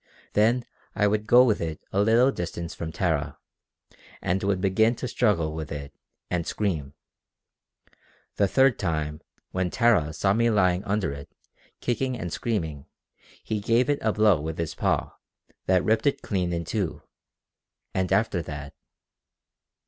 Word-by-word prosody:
Then 115 +3 +3 0.3
I 105 - +2
would 105 +1 +1
go 120 +3 +8
with 110 -5 +2
it 80 -2 -3
a 100 - +3
little 115 +5 +4
distance 85 -4 -5
from 80 -1 -5
Tara, 80 -6 -1 0.8
and 95 +2 -1
would 100 -1 0
begin 110 +5 +3
to 125 - -4
struggle 90 -12 +1
with 80 -1 -6
it, 70 -1 -6 0.3
and 85 -2 -2
scream. 80 -9 -2 1.4
The 100 - +3
third 130 +4 +3
time, 75 -4 -2 0.3
when 90 -1 -1
Tara 105 -9 +3
saw 95 +5 +2
me 115 +2 +3
lying 95 -4 +2
under 100 -5 0
it, 70 0 -8 0.5
kicking 125 +1 -1
and 85 -6 -5
screaming, 80 - -3 0.6
he 110 -1 -2
gave 115 +5 +2
it 145 - 0
a 110 - +2
blow 105 -7 +3
with 80 +1 -4
his 85 -2 -3
paw - - 0 0.6
that 95 -1 +3
ripped 110 +6 +2
it 140 - 0
clean 90 -4 -1
in 85 -1 -2
two! 95 0 -3 0.9
And 95 -1 -1
after 95 -2 +2
that...." 70 -2 -7
95 Hz, 150 wpm, -26 LUFS, 80-110 Hz, 1.4 s, go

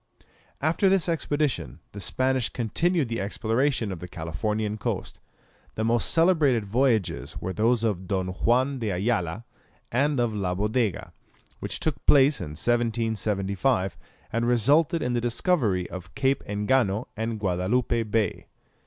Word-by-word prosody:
After 165 +6 +2
this 190 -3 +2
expedition 145 - -1
the 100 - -8
Spanish 130 +5 0
continued 155 - 0
the 115 -2 -3
exploration 115 +3 0
of 90 - -6
the 90 - -7
Californian 105 +7 -3
coast. - - -4 0.6
The 110 - -2
most 115 +1 +2
celebrated 155 - +3
voyages 110 -6 0
were 95 +1 -4
those 115 +2 +2
of 95 -5 -1
Don 95 -2 -1
Juan 125 +8 +1
de 110 -3 -2
Ayala 95 0 -1 0.5
and 140 +3 +1
of 120 -2 +1
La 95 -3 -1
Bodega, 105 +1 -1 0.5
which - - -4
took 150 -5 -2
place 140 0 +5
in 75 - -6
1775, 110 - 0 0.4
and 115 +1 0
resulted 145 +8 +3
in 125 - -1
the 120 - 0
discovery 120 - +1
of 90 -1 -9
Cape 135 0 +1
Engano 105 +1 +1
and 110 0 -3
Guadalupe 105 +6 0
Bay. 110 -1 -1
115 Hz, 135 wpm, -26 LUFS, 100-130 Hz, 0.6 s, place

